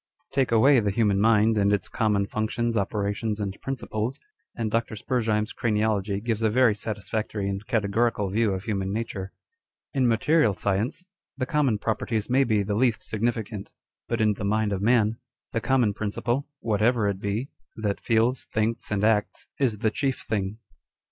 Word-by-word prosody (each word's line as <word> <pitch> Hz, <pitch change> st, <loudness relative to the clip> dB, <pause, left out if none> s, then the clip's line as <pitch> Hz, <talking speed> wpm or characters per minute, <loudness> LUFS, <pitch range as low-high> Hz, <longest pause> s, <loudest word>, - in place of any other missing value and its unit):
l -, -, -44 dB
Take 135 Hz, -3 st, +1 dB
away 125 Hz, +4 st, +6 dB
the 105 Hz, -2 st, 0 dB
human 100 Hz, -1 st, +2 dB
mind 110 Hz, 0 st, +4 dB
and 100 Hz, 0 st, +3 dB
its 105 Hz, -1 st, 0 dB
common 105 Hz, -4 st, +1 dB
functions, 115 Hz, +3 st, -1 dB
operations, 105 Hz, +1 st, -1 dB
and 100 Hz, -1 st, -4 dB
principles, 125 Hz, -2 st, -3 dB, 0.4 s
and 110 Hz, -3 st, -2 dB
Dr. 115 Hz, -1 st, -1 dB
Spurzheim's 110 Hz, -2 st, -1 dB
craniology 105 Hz, -3 st, 0 dB
gives 115 Hz, -2 st, -1 dB
a 110 Hz, -, +3 dB
very 120 Hz, 0 st, +4 dB
satisfactory 105 Hz, 0 st, -3 dB
and 100 Hz, 0 st, -3 dB
categorical 110 Hz, -3 st, +1 dB
view 110 Hz, 0 st, +2 dB
of 95 Hz, 0 st, -3 dB
human 95 Hz, -3 st, -2 dB
nature. 100 Hz, -3 st, -4 dB, 0.6 s
In 130 Hz, -3 st, +2 dB
material 115 Hz, 0 st, +3 dB
science, 105 Hz, -, -1 dB, 0.3 s
the 130 Hz, -, -1 dB
common 135 Hz, -5 st, +1 dB
properties 110 Hz, +1 st, -2 dB
may 135 Hz, +2 st, +5 dB
be 110 Hz, -5 st, +1 dB
the 100 Hz, +1 st, -2 dB
least 115 Hz, +1 st, +2 dB
significant; 110 Hz, -2 st, -3 dB, 0.4 s
but 115 Hz, -, -1 dB
in 105 Hz, -1 st, +3 dB
the 100 Hz, -, -7 dB
mind 105 Hz, +1 st, +1 dB
of 95 Hz, -, -2 dB
man, 110 Hz, 0 st, +3 dB, 0.3 s
the 115 Hz, -, -1 dB
common 125 Hz, -5 st, +2 dB
principle 120 Hz, +6 st, -2 dB
(whatever 110 Hz, 0 st, +2 dB
it 100 Hz, -2 st, -1 dB
be) 105 Hz, +7 st, -3 dB, 0.2 s
that 105 Hz, -2 st, -2 dB
feels, 115 Hz, +2 st, +1 dB
thinks, 110 Hz, +1 st, -1 dB
and 105 Hz, -1 st, -1 dB
acts, 105 Hz, -1 st, +1 dB
is 125 Hz, -6 st, +1 dB
the 110 Hz, +1 st, +1 dB
chief 135 Hz, +1 st, -1 dB
thing. 100 Hz, -1 st, -2 dB
110 Hz, 170 wpm, -26 LUFS, 105-115 Hz, 0.6 s, away